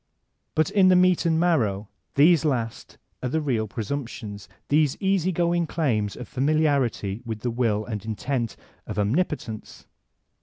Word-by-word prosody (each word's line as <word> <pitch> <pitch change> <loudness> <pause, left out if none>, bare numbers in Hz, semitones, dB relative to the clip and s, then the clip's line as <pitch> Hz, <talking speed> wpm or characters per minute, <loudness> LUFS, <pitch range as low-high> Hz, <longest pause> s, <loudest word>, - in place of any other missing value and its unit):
*' - - -51
But 155 -1 +2
m 190 -2 +6
the 185 - +6
meat 180 -1 +4
and 160 -1 +2
marrow 110 - +1 0.3
these 160 +3 +5
last 120 -7 -2 0.2
are 125 - -2
the 160 - 0
real 120 -8 -1
presumptions, 110 -3 -5 0.2
Uiese 150 -1 +2
easy 190 -2 +1
going 170 -1 +1
claims 115 -12 0
of 125 - -8
familiarity 135 -7 +1
with 110 -3 -5
the 120 - -1
will 115 -3 0
and 105 -4 -5
intent 115 +2 -2 0.3
of - - -5
Omnipotence. 110 - -2
135 Hz, 150 wpm, -25 LUFS, 110-160 Hz, 0.3 s, m